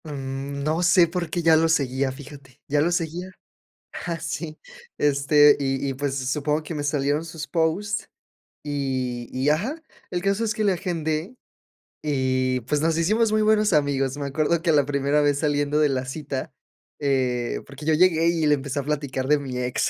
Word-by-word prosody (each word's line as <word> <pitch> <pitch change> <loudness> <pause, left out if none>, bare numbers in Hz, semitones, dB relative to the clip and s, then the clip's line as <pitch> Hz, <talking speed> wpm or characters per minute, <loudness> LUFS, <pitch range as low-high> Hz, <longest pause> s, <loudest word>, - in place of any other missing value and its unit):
Mm, 140 -1 -5
no 155 +3 0
sé 175 0 +5
porque 170 0 -3
ya 165 -1 +6
lo 165 +1 +3
seguía, 135 -3 +1
fíjate, 140 -1 -12
ya 145 +1 +2
lo 170 +3 +2
seguía, 175 +1 -2 0.8
ah, 170 -2 -3
sí, 155 0 -5 0.4
este, 145 +1 +5
y 135 0 -1
y, 135 - -2
pues, 135 0 -2
supongo 145 +3 -1
que 160 +2 -6
me 145 - -3
salieron 145 +1 0
sus 160 -2 -7
post, 175 +5 0 0.6
y 130 -4 -3
y 130 +3 0
ajá, 225 - -1 0.3
el 175 - -2
caso 195 +4 0
es 215 -1 0
que 220 -2 -2
le 200 -2 +3
agendé 165 +3 -3 0.7
y, 130 -3 0
pues, 145 +6 -1
nos 160 +1 +1
hicimos 215 +7 +2
muy 215 - +3
buenos 215 -2 +3
amigos, 140 -3 +1
me 140 -1 -3
acuerdo 155 +4 0
que 165 -1 +2
la 145 -3 +4
primera 140 +1 +1
vez, 145 -1 +2
saliendo 145 -1 +1
de 150 -1 +4
la 130 -1 -1
cita, 135 0 -5 0.5
eh, 130 -4 0
porque 140 +2 -11
yo 160 - +3
llegué 165 0 +4
y 170 -2 +1
le 150 0 +5
empecé 140 0 -4
a - - -2
platicar 140 -3 -2
de 150 +1 +4
mi 130 -3 -5
ex, 125 0 0
150 Hz, 185 wpm, -24 LUFS, 135-165 Hz, 0.8 s, ya